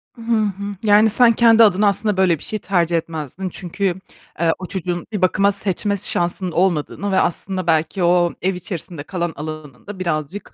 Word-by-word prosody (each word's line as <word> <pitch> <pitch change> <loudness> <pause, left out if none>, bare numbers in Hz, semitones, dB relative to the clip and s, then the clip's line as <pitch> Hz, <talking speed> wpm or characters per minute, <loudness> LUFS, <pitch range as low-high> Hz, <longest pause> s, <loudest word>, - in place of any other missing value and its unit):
Hı 235 - -13
hı. 205 -3 -1
Yani, 210 +1 +5
sen 235 +2 +5
kendi 230 0 +6
adına 205 0 +4
aslında 205 0 0
böyle 180 -4 +3
bir - - -13
şey 215 - -3
tercih 175 -4 +1
etmezdin. 165 +3 -5
Çünkü, 185 +1 -3 0.4
eee, 165 -1 +3
o 185 - -6
çocuğun 180 -1 -4
bir 205 - -3
bakıma 195 +2 +3
seçme 200 +1 -1
şansının 180 -1 -1
olmadığını 185 +3 0
ve 190 - +3
aslında 185 0 -1
belki 160 +3 +1
o 175 0 +3
ev 185 +1 0
içerisinde 170 -3 -7
kalan 175 -1 -3
alanının 150 -1 -8
da 205 -2 -8
birazcık, 170 +2 -4
185 Hz, 175 wpm, -20 LUFS, 170-205 Hz, 0.4 s, kendi